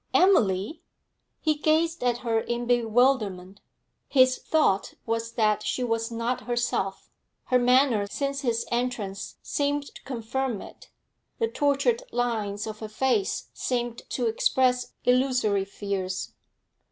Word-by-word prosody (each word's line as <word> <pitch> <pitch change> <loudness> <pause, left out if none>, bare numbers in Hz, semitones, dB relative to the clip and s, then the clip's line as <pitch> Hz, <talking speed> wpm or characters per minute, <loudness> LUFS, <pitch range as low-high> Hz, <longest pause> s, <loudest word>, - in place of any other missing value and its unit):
'Emily!' 225 - +3 0.6
He 310 - +3
gazed 315 +1 +1
at 245 -1 +2
her 225 -1 +2
in 240 +1 -3
bewilderment. 225 -5 +1 0.5
His 255 -2 +4
thought 300 -11 +1
was 230 0 -2
that 215 -3 +2
she 250 +4 -2
was 230 -1 -1
not 235 +2 -2
herself; 240 -5 -1 0.3
her 250 - +2
manner 250 -4 +4
since 275 +5 -2
his 235 -4 0
entrance 235 -5 -2
seemed 285 -1 -1
to - - -12
confirm 245 -1 -3
it; - - -12 0.5
the 455 - +1
tortured 450 - +1
lines 215 -4 -1
of 215 -1 -6
her 220 - -6
face 265 - 0
seemed 240 -2 -2
to 245 - -1
express 250 +2 +1
illusory 250 -6 +2
fears. 195 -2 -4
240 Hz, 125 wpm, -26 LUFS, 215-265 Hz, 0.6 s, His